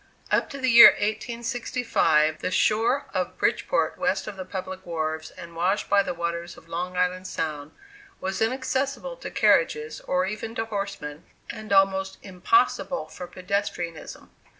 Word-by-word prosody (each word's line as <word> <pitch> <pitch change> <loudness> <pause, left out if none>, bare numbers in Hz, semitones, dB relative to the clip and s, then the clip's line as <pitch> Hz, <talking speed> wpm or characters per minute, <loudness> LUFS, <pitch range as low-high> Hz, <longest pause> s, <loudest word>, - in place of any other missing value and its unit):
Up - - +2
to 280 - -7
the 260 -2 +1
year 235 0 +11
1865, 225 -8 0
the - - -2
shore 225 +8 +2
of - - -2
Bridgeport - - 0
west - - 0
of 210 - -6
the 190 - -6
public 185 0 -6
wharves, 160 -2 -3
and 170 -2 -12
washed 185 +6 0
by 200 0 +6
the 185 - -3
waters 170 0 -4
of - - -16
Long 180 +2 -4
Island 180 +1 0
Sound, 150 -3 -4 0.5
was 190 +1 -3
inaccessible 265 - -1
to - - -7
carriages, 455 -2 +2
or 180 0 +1
even 215 +3 -5
to 225 - -1
horsemen, 200 -8 -5 0.3
and 215 -1 -9
almost 195 0 +3
impossible 195 - +1
for 180 - -8
pedestrianism. 180 -3 -4
190 Hz, 150 wpm, -25 LUFS, 170-225 Hz, 0.5 s, year